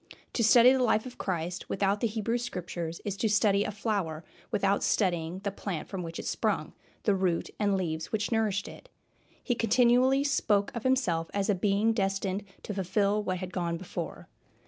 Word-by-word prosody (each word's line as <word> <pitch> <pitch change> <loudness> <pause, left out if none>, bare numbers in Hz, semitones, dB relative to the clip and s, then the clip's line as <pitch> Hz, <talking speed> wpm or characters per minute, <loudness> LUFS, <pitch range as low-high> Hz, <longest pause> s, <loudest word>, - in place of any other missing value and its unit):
To 235 - +1
study 235 +4 +7
the 265 - +1
life 220 -2 +2
of 250 - -10
Christ 175 -1 -3
without 200 +1 +1
the 230 - +1
Hebrew 225 +2 -1
Scriptures 175 -6 -5
is 200 -2 -2
to 220 - +1
study 205 -1 +3
a - - -3
flower 200 -7 -2 0.3
without 200 0 +1
studying 175 -2 0
the 200 - -1
plant 195 -4 -5
from 190 -2 -5
which 165 -1 -6
it - - -6
sprung, - - -1 0.3
the 205 - +3
root 185 -3 0
and 200 -2 +2
leaves 160 -3 -3
which 220 +2 -1
nourished 215 -3 0
it. - - -12 0.5
He 245 - +1
continually 245 +4 +4
spoke 210 -8 +1
of 235 - -3
himself 200 -12 +1
as 200 +1 +1
a - - +3
Being 205 +4 +2
destined 195 -1 -1 0.2
to 210 - -4
fulfill 200 +2 +1
what 185 -3 -2
had 185 0 -6
gone 170 -2 -1
before. 180 +1 -6
200 Hz, 185 wpm, -29 LUFS, 185-225 Hz, 0.5 s, study